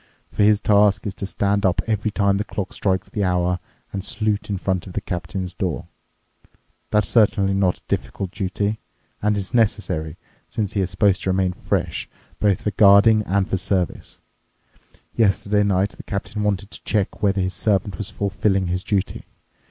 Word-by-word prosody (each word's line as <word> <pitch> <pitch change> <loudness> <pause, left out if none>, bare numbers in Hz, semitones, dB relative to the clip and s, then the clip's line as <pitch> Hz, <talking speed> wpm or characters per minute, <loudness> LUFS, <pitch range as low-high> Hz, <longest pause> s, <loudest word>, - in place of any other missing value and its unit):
For - - -1
his 105 0 +5
task 105 -1 +3
is 100 - -2
to 100 - -5
stand 100 0 0
up 90 -1 +2
every 110 -1 0
time 100 -1 +2
the 105 - -1
clock 100 -2 -5
strikes 95 -1 0
the 105 - -2
hour 90 -1 +1 0.3
and 95 -2 -3
salute 105 0 -1
in 100 - -1
front 95 -1 -2
of 90 - -9
the - - -1
captain's 90 +1 -4
door. 90 -2 -3 1.0
That's 105 -2 +2
certainly 100 -3 +3
not 95 -2 +2
a - - -21
difficult 95 -2 -3
duty—and 105 +2 -3
it's 95 -2 -4
necessary, 95 -8 0 0.3
since 105 -4 -2
he 100 - +1
is 95 - -1
supposed 95 +1 +2
to - - -1
remain 95 -1 +1
fresh - - -2 0.3
both 100 -3 +2
for 105 - -1
guarding 105 +2 +6
and 95 +1 +1
for 95 - 0
service. 95 -1 -2 0.9
Yesterday 105 -1 +2
night 100 0 +2
the - - -11
captain 105 +1 -4
wanted 100 0 -1
to - - -8
check 105 -1 -1
whether 100 -1 +2
his 95 0 -1
servant 95 0 0
was 105 - -2
fulfilling 100 -1 0
his 90 +1 -1
duty. 100 -2 -2
100 Hz, 175 wpm, -22 LUFS, 95-105 Hz, 1.0 s, guarding